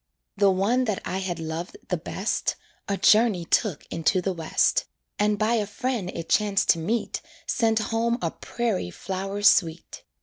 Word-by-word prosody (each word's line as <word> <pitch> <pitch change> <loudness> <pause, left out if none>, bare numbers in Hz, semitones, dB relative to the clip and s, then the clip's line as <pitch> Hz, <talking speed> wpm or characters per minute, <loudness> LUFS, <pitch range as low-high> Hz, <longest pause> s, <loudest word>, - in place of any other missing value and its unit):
The 200 -1 +4
one 205 +7 +2
that 210 -4 -1
I 185 - -2
had 185 -3 -3
loved 165 - -5
the - - +1
best - - -2 0.3
A 200 - -1
journey 210 -6 +4
took 185 -2 +1
into 165 +3 +1
the 190 +1 -1
West, 165 -2 +1 0.3
And 210 0 +2
by 215 +2 +1
a 215 -3 +1
friend 220 -2 -2
it 165 - -5
chanced 205 -2 +2
to 170 - +5
meet 220 +9 -2 0.2
Sent 225 -2 +1
home 230 +2 0
a 165 -5 -1
prairie 225 - -2
flower 195 - -5
sweet. 165 -4 +3
200 Hz, 165 wpm, -25 LUFS, 175-225 Hz, 0.3 s, to